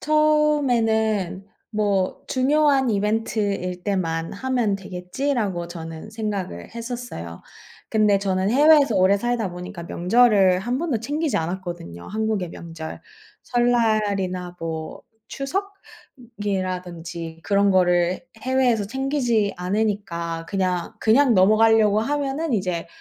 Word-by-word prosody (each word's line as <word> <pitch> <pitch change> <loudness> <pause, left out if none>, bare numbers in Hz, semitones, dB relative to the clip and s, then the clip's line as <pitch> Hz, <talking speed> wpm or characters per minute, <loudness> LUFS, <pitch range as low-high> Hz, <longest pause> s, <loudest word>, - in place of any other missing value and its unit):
처음에는 245 - +2 0.3
'뭐 205 -4 0
중요한 275 0 +3
이벤트일 205 -3 -1
때만 165 -5 -2
하면 235 -2 0
되겠지.'라고 195 +1 -3
저는 165 +2 -8
생각을 205 - -4
했었어요. 235 - -6 0.5
근데 210 -2 +3
저는 190 0 0
해외에서 290 -1 +5
오래 190 +2 +4
살다 235 -2 -1
보니까 180 +1 -8
명절을 195 0 +4
1 245 +6 -2
번도 300 -9 -1
챙기지 290 +1 -1
않았거든요, 170 - -5
한국의 215 -4 -2
명절. 165 -2 -8 0.4
설날이나 210 -7 0
뭐 160 -1 -5 0.3
추석? 390 +9 -4 0.7
이라던지 180 -4 -4
그런 200 0 +3
거를 180 -1 +2 0.2
해외에서 250 -5 +2
챙기지 245 -4 0
않으니까 180 -4 -2
그냥, 185 -3 -1
그냥 245 +4 +4
넘어가려고 215 +2 +5
하면은 285 +4 -1
이제 180 -6 -1
205 Hz, 270 characters per minute, -23 LUFS, 180-245 Hz, 0.7 s, 해외에서